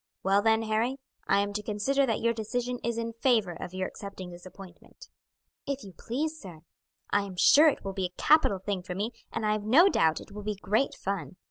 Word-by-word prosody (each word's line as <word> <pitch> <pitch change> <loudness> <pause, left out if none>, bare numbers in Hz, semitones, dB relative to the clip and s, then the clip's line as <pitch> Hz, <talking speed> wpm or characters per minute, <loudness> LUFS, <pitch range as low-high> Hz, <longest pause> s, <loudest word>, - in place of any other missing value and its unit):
Well, 195 +1 +3
then, 220 +1 +3
Harry, 225 +4 0 0.3
I 200 - +4
am 205 0 -3
to 210 - -2
consider 230 +7 0
that 225 - -1
your 235 0 +2
decision 245 +3 -3
is 235 0 -1
in 230 0 -3
favour 225 -8 +3
of 175 - -7
your 185 0 -1
accepting 195 -3 -9
this 175 +1 -11
appointment." 185 -2 -14 0.6
"If 275 -1 -3
you 195 -2 -11
please, 305 - -4
sir. 175 -6 -11 0.5
I 205 - +3
am 195 -2 -7
sure 300 - +7
it 285 - -5
will 195 - -3
be 190 -1 -2
a 180 0 -8
capital 305 -10 +4
thing 190 0 -3
for 180 0 -6
me, 210 +5 -2 0.2
and 225 - -3
I 210 - +2
have 210 -1 -1
no 295 - +6
doubt 160 - +2
it - - -13
will 210 +1 -7
be 210 0 -3
great 215 +7 0
fun. 195 -2 -4
210 Hz, 225 wpm, -28 LUFS, 195-235 Hz, 0.6 s, sure